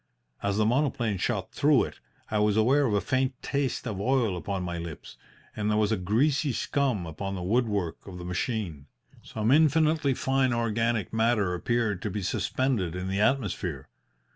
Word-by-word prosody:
As 100 0 0
the 110 - +3
monoplane 120 -5 +1
shot - - -1
through - - +4
it, - - -7 0.3
I 105 - +1
was 105 0 +2
aware 135 +6 +4
of 110 - 0
a 100 - +2
faint 130 +5 0
taste 140 -3 -1
of 105 -5 -3
oil 120 -4 +1
upon 95 +2 -3
my 85 -1 -3
lips, 85 -3 -8 0.4
and 105 0 -1
there 105 - +2
was 105 0 +2
a - - +3
greasy 130 - +1
scum 125 -5 0
upon 95 +5 -5
the 90 - -4
woodwork 100 -5 -1
of 90 -2 -8
the 90 - -7
machine. 90 - -3 0.3
Some 110 +2 -1
infinitely 155 -1 +3
fine 135 -1 +1
organic 115 -2 0
matter 110 -4 +2
appeared 105 +1 0
to 105 - -2
be 100 0 -4
suspended 100 -3 -1
in 90 +1 -3
the 95 +1 -1
atmosphere. 125 -3 -1
110 Hz, 175 wpm, -27 LUFS, 95-130 Hz, 0.4 s, through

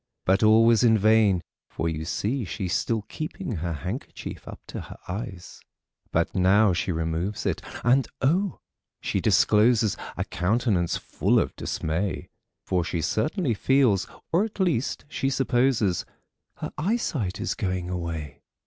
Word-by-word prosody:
But 95 +2 +3
all 110 +1 +6
was 115 0 +5
in 110 -2 +5
vain; 105 -4 +4 0.3
for 85 - -2
you 80 -1 -3
see 115 - -1
she's 90 0 -3
still 110 -3 0
keeping 155 - -5
Her 85 +1 -2
handkerchief 90 - -6
up - - -8
to - - -5
her - - -10
eyes. 95 -2 -6 0.5
But - - +1
now 95 +2 +4
she 85 +1 -1
removes 80 +4 -2
it, - - 0 0.2
and 125 +2 +4
oh! 175 +8 +1 0.4
she - - -1
discloses 110 0 +4 0.2
A - - -1
countenance 95 - +1
full - - 0
of - - +1
dismay; 85 +5 -2 0.4
For 90 -2 +1
she 85 0 -2
certainly 150 - 0
feels, 115 -3 +3 0.2
or 175 +5 +3
at 220 -1 -6
least 160 -10 0
she 135 -2 -1
supposes 125 -7 +2 0.5
Her - - -6
eyesight 150 - -1
is 115 - -1
going 95 -3 -2
away. 85 -5 -5
105 Hz, 145 wpm, -26 LUFS, 90-125 Hz, 0.5 s, all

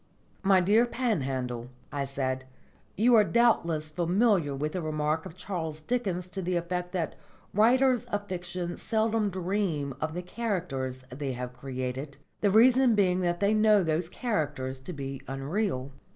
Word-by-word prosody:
"My 195 -2 +5
dear 215 +6 +4
Panhandle," 130 - -2 0.2
I 140 -1 -2
said, 130 -1 -2 0.5
"you 240 +5 +4
are 220 -2 +8
doubtless 170 -10 +2
familiar 175 -2 +2
with 150 +3 -2
the 180 - -3
remark 155 0 -1
of 160 - -13
Charles 160 -6 -4
Dickens 190 -1 -1
to 190 +1 -4
the 180 0 -1
effect 180 +1 -2
that 170 -4 -1 0.4
writers 245 +4 +4
of 205 0 -3
fiction 180 -1 -4
seldom 220 -1 +1
dream 180 -6 -1
of 160 +1 -2
the 180 - -3
characters 165 - -3
they 135 +1 -3
have 125 0 -5
created, 130 +2 -5 0.2
the 205 - +3
reason 245 +3 +6
being 185 -3 +3
that 175 -1 0
they 200 +1 +3
know 215 -2 +5
those 165 +1 0
characters 145 - -2
to 130 +7 -8
be 135 -4 -5
unreal." 135 +1 -2
175 Hz, 150 wpm, -28 LUFS, 140-205 Hz, 0.5 s, are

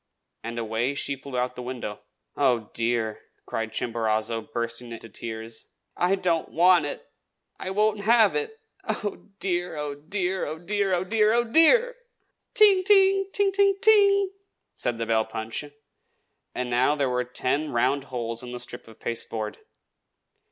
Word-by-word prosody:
And 115 +1 -5
away 115 +4 -1
she 140 0 -2
flew 130 -1 -7
out 125 0 0
of - - -27
the 125 - -6
window. 125 -4 -6 0.4
"Oh, 125 -6 +1
dear!" 115 -2 -1 0.2
cried 115 0 -3
Chimborazo, 115 -1 -1
bursting 115 +1 -4
into 115 0 -9
tears. 110 +1 -7 0.3
"I 180 +2 +2
don't 175 -4 0
want 175 -2 +4
it! - - -5 0.5
I - - -4
won't 210 +2 +1
have 220 +2 +4
it! 445 0 -3 0.2
Oh, 205 0 -4
dear! 175 -3 -1
oh, 150 -1 -3
dear! 180 +5 -2
oh, 155 +2 -5
dear! 195 +3 -1
oh, 175 - -1
dear! 215 +2 +2
oh, 240 0 +3
DEAR!!!" 465 - +5 0.6
"Ting! 400 -3 +6
ting! 390 -1 +4
ting 405 -1 +2
ting 395 0 +3
ting - - -23
ting!" 400 -2 +5 0.4
said 120 -2 -2
the 115 - -2
bell 110 -1 +2
punch; 110 +4 -4 0.9
and 125 -1 -3
now 130 +5 +3
there 140 -2 0
were 125 0 0
ten 130 +4 -2
round 130 +3 +1
holes 115 -3 -4
in 125 -1 -8
the 125 - -5
strip 120 -1 -8
of 110 - -15
pasteboard. 110 -2 -4
140 Hz, 160 wpm, -25 LUFS, -, 0.9 s, Ting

